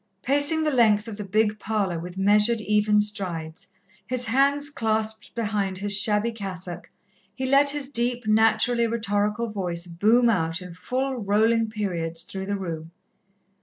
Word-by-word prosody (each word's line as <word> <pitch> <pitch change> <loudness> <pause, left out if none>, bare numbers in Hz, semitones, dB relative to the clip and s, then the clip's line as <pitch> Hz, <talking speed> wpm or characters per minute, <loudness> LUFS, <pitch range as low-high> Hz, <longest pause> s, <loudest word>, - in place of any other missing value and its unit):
Pacing 290 +4 +2
the 305 - +1
length 220 -4 +3
of 220 - -6
the 210 - -5
big 210 +2 0
parlour 200 -6 -1
with 175 +2 -8
measured, 210 +4 +3
even 210 0 +2
strides, 180 -6 -2 0.4
his 250 -1 0
hands 280 +4 +1
clasped 220 -3 -1
behind 205 -4 -2
his 205 +1 -1
shabby 210 +3 +1
cassock, 190 -5 -7 0.5
he 260 - -3
let 275 +2 +5
his 285 -1 -1
deep, 240 -1 0
naturally 225 +2 +3
rhetorical 215 0 -1
voice 175 -4 -3
boom 215 +8 +3
out 165 -7 0
in 180 -2 -10
full, 255 +9 -3
rolling 220 +3 +2
periods 170 -6 -3
through 190 +2 -7
the 200 0 -1
room. 165 -4 -6
210 Hz, 150 wpm, -24 LUFS, 195-235 Hz, 0.5 s, let